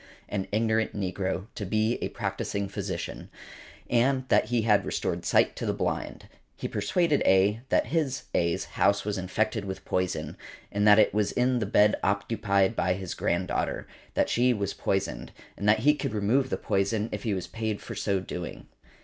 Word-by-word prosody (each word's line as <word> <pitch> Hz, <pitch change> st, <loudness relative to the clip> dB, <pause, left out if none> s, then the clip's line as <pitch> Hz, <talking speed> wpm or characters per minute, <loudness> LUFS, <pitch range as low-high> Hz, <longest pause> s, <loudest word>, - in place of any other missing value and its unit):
an 95 Hz, -2 st, -2 dB
ignorant 110 Hz, 0 st, +1 dB
negro, 95 Hz, 0 st, -2 dB
to 105 Hz, -, -5 dB
be 110 Hz, +4 st, 0 dB
a -, -, -1 dB
practising 100 Hz, -1 st, -3 dB
physician, 95 Hz, -4 st, -5 dB, 0.6 s
and 130 Hz, +2 st, +2 dB
that -, -, +4 dB
he 115 Hz, 0 st, 0 dB
had 105 Hz, -2 st, +4 dB
restored -, -, -2 dB
sight -, -, +3 dB
to -, -, -6 dB
the -, -, 0 dB
blind. -, -, -3 dB, 0.3 s
He -, -, -4 dB
persuaded 165 Hz, -5 st, +1 dB
A. 100 Hz, +4 st, +4 dB
that -, -, +3 dB
his 150 Hz, -5 st, -1 dB
(A.'s) 85 Hz, -1 st, +1 dB
house 100 Hz, 0 st, +1 dB
was 105 Hz, -2 st, -2 dB
infected 110 Hz, +4 st, -1 dB
with 95 Hz, -1 st, -6 dB
poison, 90 Hz, -4 st, -2 dB, 0.3 s
and 100 Hz, +1 st, +1 dB
that 105 Hz, 0 st, +8 dB
it 110 Hz, -, +4 dB
was 105 Hz, -1 st, +1 dB
in 125 Hz, 0 st, +1 dB
the 105 Hz, -, -1 dB
bed 105 Hz, +1 st, +4 dB
occupied 100 Hz, 0 st, +1 dB
by 90 Hz, -3 st, +1 dB
his 95 Hz, -2 st, -5 dB
granddaughter, 85 Hz, +1 st, -1 dB, 0.3 s
that -, -, +2 dB
she 125 Hz, +1 st, +3 dB
was 100 Hz, -1 st, -2 dB
poisoned, 95 Hz, 0 st, -2 dB, 0.2 s
and 100 Hz, -, 0 dB
that 110 Hz, +1 st, +4 dB
he 150 Hz, +5 st, +5 dB
could 130 Hz, -6 st, -3 dB
remove 120 Hz, +6 st, +2 dB
the -, -, -1 dB
poison 100 Hz, +3 st, 0 dB
if 105 Hz, -, -4 dB
he 105 Hz, -3 st, -1 dB
was 90 Hz, -2 st, -3 dB
paid 110 Hz, -1 st, -3 dB
for 115 Hz, -, -8 dB
so 100 Hz, -2 st, 0 dB
doing. 90 Hz, -2 st, -6 dB
105 Hz, 180 wpm, -27 LUFS, 95-115 Hz, 0.6 s, that